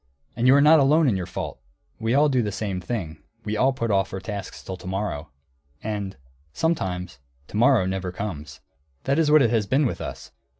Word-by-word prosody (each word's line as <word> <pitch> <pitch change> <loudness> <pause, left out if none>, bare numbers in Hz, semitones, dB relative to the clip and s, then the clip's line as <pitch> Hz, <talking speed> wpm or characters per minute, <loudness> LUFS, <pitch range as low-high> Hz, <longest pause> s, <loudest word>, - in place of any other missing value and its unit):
And 120 +1 +1
you 130 - +7
are 140 - +6
not 155 +2 +7
alone 150 +3 +4
in 115 - +2
your 90 -2 -3
fault. - - -5 0.4
We 115 +3 0
all 150 +2 +5
do 130 -4 +2
the 105 -2 -2
same 100 -3 -3
thing, 85 -6 -5 0.2
we 105 0 -2
all 130 +5 +3
put 115 -4 -2
off 95 -1 +1
our 95 - -4
tasks 100 +1 -7
till 95 - -5
to 90 - -11
morrow. 95 -6 -3 0.5
And 100 -5 -4 0.4
sometimes 90 - -2 0.3
to - - -5
morrow 120 -3 +4
never 95 -1 -2
comes. 80 -8 -6 0.4
That 140 +3 +1
is 160 -2 +3
what 150 -1 +6
it 115 - +2
has 110 -4 +1
been 140 +6 +2
with 120 - -2
us. - - -7
105 Hz, 210 wpm, -24 LUFS, 95-135 Hz, 0.5 s, you